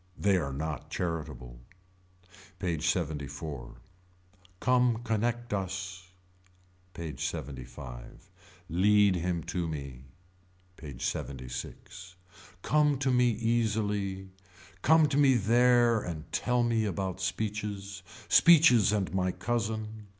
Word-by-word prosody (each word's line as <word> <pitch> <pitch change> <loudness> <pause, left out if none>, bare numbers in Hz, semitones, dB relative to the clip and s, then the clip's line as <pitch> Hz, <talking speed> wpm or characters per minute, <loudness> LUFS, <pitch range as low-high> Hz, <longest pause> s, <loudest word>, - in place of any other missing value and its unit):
They 100 -1 +2
are 70 -6 -2
not 75 +1 -5
charitable. 70 -8 -4 1.0
PAGE 85 -4 -2
LXXIV. 70 -5 -5 0.8
Come 125 -1 +3
Connect 120 +1 -1
Us. 95 -1 -4 0.9
PAGE 80 -3 -6
LXXV. 65 -2 -8 0.6
Lead 100 +3 +4
him 85 -1 -2
to 85 0 -3
me. 70 -4 -7 0.7
PAGE 70 -8 -9
LXXVI. 70 +7 -6 0.5
Come 150 -1 +3
to 135 0 0
me 125 -1 +4
easily. 105 -4 -1 0.5
Come 160 +3 +5
to 140 -1 -1
me 140 -3 +5
there 120 +1 +4
and 80 -4 -7
tell 125 0 +1
me 115 -2 +1
about 95 -1 -3
speeches. 100 -1 -3 0.3
Speeches 145 - +6
and 100 -4 -1
my 95 -1 +1
cousin. 110 -1 -3
95 Hz, 100 wpm, -29 LUFS, 80-115 Hz, 1.0 s, Speeches